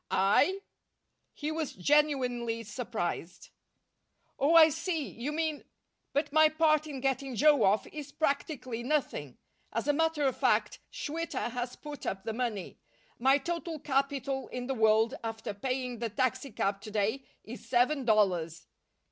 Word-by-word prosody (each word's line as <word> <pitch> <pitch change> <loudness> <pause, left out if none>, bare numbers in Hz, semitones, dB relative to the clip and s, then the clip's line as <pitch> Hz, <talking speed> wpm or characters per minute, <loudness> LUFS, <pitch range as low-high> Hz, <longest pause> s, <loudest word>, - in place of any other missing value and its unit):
"I?" 290 - +3 0.7
He 300 +1 -4
was 315 -2 -3
genuinely 245 -1 +1
surprised. 190 -6 -4 0.9
"Oh, 300 +5 +3
I 320 -1 +9
see. 320 -1 -2
You 255 +6 -5
mean 315 -1 -2 0.5
but 290 0 -1
my 310 0 +6
part 310 -1 +2
in 275 -4 -6
getting 270 -1 -1
Joe 295 +1 +5
off 200 +3 +3
is 295 -2 -8
practically 280 -5 -2
nothing. 240 - -2 0.3
As 230 +5 -2
a 290 - +4
matter 325 0 +1
of 265 -2 +2
fact, - - +1
Schwitter 310 -5 -3
has 245 0 -4
put 295 -1 -8
up 190 0 -3
the 225 - -3
money. 220 -6 -3 0.4
My 265 +3 +5
total 335 +1 -4
capital 275 -1 -1
in 250 0 -5
the 270 - -1
world, 220 -1 +3
after 225 -2 -4
paying 250 +2 -3
the 230 -1 -2
taxicab 255 -5 -1
to - - -8
day, 215 +5 0 0.2
is 235 +4 -10
seven 260 +3 +2
dollars." 180 -8 +1
265 Hz, 145 wpm, -30 LUFS, 225-300 Hz, 0.9 s, I